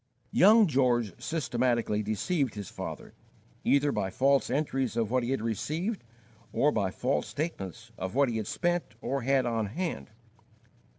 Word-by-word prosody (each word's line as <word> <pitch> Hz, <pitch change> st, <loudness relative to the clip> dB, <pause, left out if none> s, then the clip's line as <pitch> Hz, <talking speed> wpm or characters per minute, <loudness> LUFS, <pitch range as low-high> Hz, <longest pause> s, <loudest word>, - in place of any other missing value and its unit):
Young 215 Hz, +4 st, +7 dB
George 125 Hz, -, +2 dB
systematically 120 Hz, -7 st, 0 dB
deceived 110 Hz, -, -1 dB
his 100 Hz, -3 st, -6 dB
father, -, -, -7 dB, 0.5 s
either 140 Hz, +1 st, +3 dB
by 95 Hz, -, -1 dB
false 135 Hz, +5 st, +2 dB
entries 135 Hz, -3 st, -1 dB
of 115 Hz, -2 st, 0 dB
what 130 Hz, 0 st, +2 dB
he 120 Hz, -, -3 dB
had 135 Hz, -4 st, -1 dB
received, 155 Hz, -, -2 dB, 0.5 s
or 150 Hz, -, +3 dB
by 100 Hz, -7 st, 0 dB
false 125 Hz, +8 st, -1 dB
statements 120 Hz, -, -5 dB
of 95 Hz, +3 st, -4 dB
what 140 Hz, 0 st, +4 dB
he 115 Hz, -2 st, -2 dB
had 110 Hz, -2 st, -3 dB
spent 175 Hz, -, -1 dB
or 135 Hz, +3 st, -2 dB
had 135 Hz, +1 st, +2 dB
on 115 Hz, -3 st, 0 dB
hand. 115 Hz, -, -4 dB
125 Hz, 155 wpm, -29 LUFS, 110-145 Hz, 0.5 s, Young